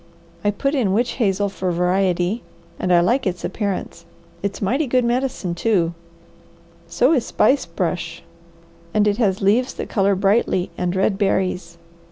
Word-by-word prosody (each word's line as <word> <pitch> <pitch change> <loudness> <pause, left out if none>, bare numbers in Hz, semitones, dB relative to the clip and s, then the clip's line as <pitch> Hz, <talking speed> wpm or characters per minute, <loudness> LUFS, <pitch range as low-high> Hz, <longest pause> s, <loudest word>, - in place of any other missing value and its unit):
I 205 - +3
put 275 +8 -1
in 230 -10 +1
witch 240 +4 +1
hazel 200 -1 +2
for 190 -2 -3
variety, 180 +3 +1 0.4
and 180 - -1
I 175 -1 +6
like 235 +7 +1
its 180 -1 -3
appearance; 195 -4 -3 0.4
it's 200 0 -3
mighty 265 +9 0
good 250 0 +2
medicine, 245 -7 -1
too; 175 -3 +1 0.9
so - - +3
is 255 -7 +1
spice 260 -2 +2
brush, 170 -1 -3 0.7
and 210 0 +4
it 205 0 +1
has 200 -5 +1
leaves 230 +6 +2
that - - -5
colour 200 -2 +2
brightly, 195 -1 +1
and 180 0 -2
red 195 +1 +1
berries. 185 -4 -1
195 Hz, 155 wpm, -21 LUFS, 180-230 Hz, 0.9 s, I